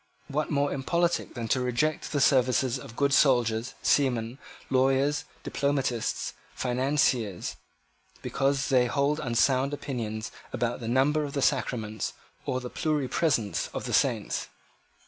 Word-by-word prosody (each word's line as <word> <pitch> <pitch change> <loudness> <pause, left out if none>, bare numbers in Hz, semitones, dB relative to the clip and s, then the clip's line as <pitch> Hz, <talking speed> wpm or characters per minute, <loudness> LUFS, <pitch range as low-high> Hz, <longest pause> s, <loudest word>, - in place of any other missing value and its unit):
What 150 +2 -1
more 145 -1 +1
impolitic 170 +6 0
than 115 -2 -3
to 130 - +2
reject 125 +5 0
the 145 - 0
services 130 -2 +3
of 115 - -11
good 140 +1 +2
soldiers, 120 -4 +3
seamen, 125 -3 +1 0.3
lawyers, 135 +3 +2 0.2
diplomatists, 135 -5 -1 0.2
financiers, 125 -6 0 0.7
because 135 0 0
they 125 -2 +4
hold 140 +4 +1
unsound 130 +2 +2
opinions 115 -5 -4 0.2
about 120 0 -1
the 115 - -6
number 135 +5 +2
of 140 -1 -5
the 140 - -1
sacraments 110 -4 -1 0.3
or 130 - 0
the 125 -1 -7
pluripresence 145 -6 0
of - - -3
saints? - - 0
130 Hz, 125 wpm, -28 LUFS, 120-140 Hz, 0.7 s, they